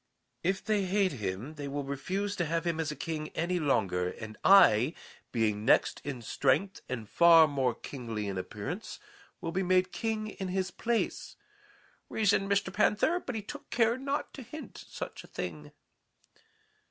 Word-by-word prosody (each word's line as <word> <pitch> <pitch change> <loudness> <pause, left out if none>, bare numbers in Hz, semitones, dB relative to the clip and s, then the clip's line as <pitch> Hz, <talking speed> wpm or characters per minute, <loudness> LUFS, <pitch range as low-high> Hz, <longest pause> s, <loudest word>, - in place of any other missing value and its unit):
"'If 190 +2 0
they 210 -3 +1
hate 190 0 +2
him, 105 +3 -4
they 145 -2 -6
will 140 +1 -3
refuse 185 +10 -2
to 175 - +1
have 165 +2 -1
him 165 -1 0
as 155 -2 -1
king 155 -2 -3
any 175 +2 0
longer, 95 - +1
and 110 +3 -8
I, 155 - +6 0.4
being 105 -3 0
next 120 - +3
in 130 -4 -5
strength 165 - +1
and 120 -4 -4
far 165 +4 +7
more 135 -5 0
kingly 115 -6 -5
in 100 - -3
appearance, 105 - -5 0.4
will 165 - -3
be 185 +3 0
made 185 0 +2
king 220 -1 -2
in 190 -2 -5
his 185 0 -1
place,' 235 +4 -2 0.7
reasoned 200 -2 +2
Mr. 195 -1 +1
Panther, 210 - +3
but 255 -8 -6
he 215 - -3
took 290 +7 -9
care 230 -1 +3
not 275 +2 -3
to 275 - -8
hint 260 +1 -9
such - - -7
a - - -14
thing. 75 -4 -6
170 Hz, 165 wpm, -30 LUFS, 125-200 Hz, 0.7 s, far